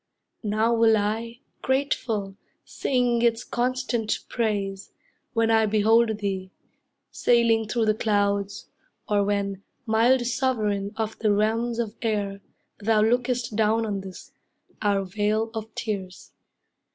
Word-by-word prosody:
Now 220 +2 +1
will 225 -1 +4
I, 225 +4 -2 0.2
grateful, 235 -7 -1 0.3
sing 245 -3 0
its 235 0 +2
constant 245 -3 -1
praise, 200 -4 -2 0.4
When 225 -1 +2
I 220 -1 +4
behold 220 +1 +3
thee, 190 -2 -3 0.6
sailing 230 -2 +3
through 225 +1 0
the 215 - +3
clouds, 200 -2 0 0.4
Or 205 -1 +2
when, 200 -1 -1 0.2
mild 240 +3 +3
sovereign 220 -5 0
of 220 -1 -3
the 215 -2 +2
realms 225 +3 +1
of 225 -3 -2
air, 205 -3 -1 0.4
Thou 215 +1 +2
lookest 245 0 0
down 220 +1 +2
on 200 -3 -2
this, 190 -1 -11 0.5
our 200 -2 +2
vale 210 +3 -1
of 220 -1 -6
tears. 190 -4 -5
220 Hz, 120 wpm, -25 LUFS, 205-235 Hz, 0.6 s, will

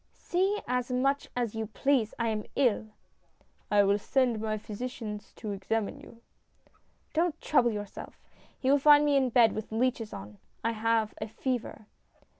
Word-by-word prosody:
" - - -43
See 385 +4 0
as 250 0 -1
much 275 +3 +1
as 240 -3 -1
you 220 -1 -3
please. 245 0 +1
I 235 -1 0
am 215 -1 -2
ill! 235 -5 +2 0.3
" - - -41
" - - -41
I 205 -1 +6
will 200 +1 +3
send 245 -1 +1
my 215 -1 -1
physician 215 0 -6
to 215 - -5
examine 205 +2 -2
you." 230 0 -15 0.9
"Don't 330 0 +1
trouble 250 -5 +3
yourself. 205 -2 -7 0.4
He 265 0 +1
will 285 - +5
find 295 +1 +7
me 290 -1 +3
in 265 -2 +3
bed 230 -2 +5
with 215 0 -6
leeches 230 -1 0
on. 100 +1 -9 0.2
I 230 - +1
have 225 -1 +1
a 215 - -2
fever." 240 -1 -4
230 Hz, 175 wpm, -29 LUFS, 215-260 Hz, 0.9 s, find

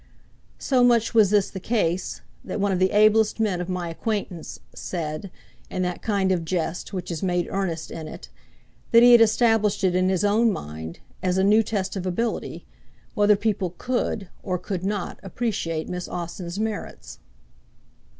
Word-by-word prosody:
So 255 -3 +2
much 235 -2 +3
was 220 -4 +5
this 205 -1 +2
the 190 - -6
case, 185 -4 -1 0.2
that - - -4
one 200 0 +1
of 185 - 0
the 185 0 +3
ablest 215 +1 +4
men 200 -5 +1
of 180 - -5
my 180 -1 -2
acquaintance 190 -1 -4
{136b} - - -22
said, 165 +1 -4 0.4
in 185 - -2
that 180 -1 -3
kind 200 -3 +1
of 175 -3 0
jest 170 0 -3
which 185 -3 -5
has 165 -3 -4
much 180 -2 0
earnest 175 -5 -3
in 160 -1 -6
it, - - -9 0.6
that 230 0 +7
he 245 - +8
had 240 -1 +8
established 225 -2 +3
it 185 -2 +3
in 185 +1 +2
his 185 -1 +1
own 220 +3 +3
mind, 80 - -7 0.2
as 185 0 0
a 190 - +3
new 210 +3 +5
test 195 -3 -2
of 190 -1 -3
ability, 230 +6 -2 0.5
whether 205 0 +4
people 195 -4 -1
could 240 -5 -2
or 185 -2 -2
could 185 0 -4
not 200 -1 -3
appreciate 190 -6 -3
Miss 180 0 -4
Austen's 175 +1 -5
merits. 215 -1 -5
190 Hz, 175 wpm, -24 LUFS, 180-215 Hz, 0.6 s, he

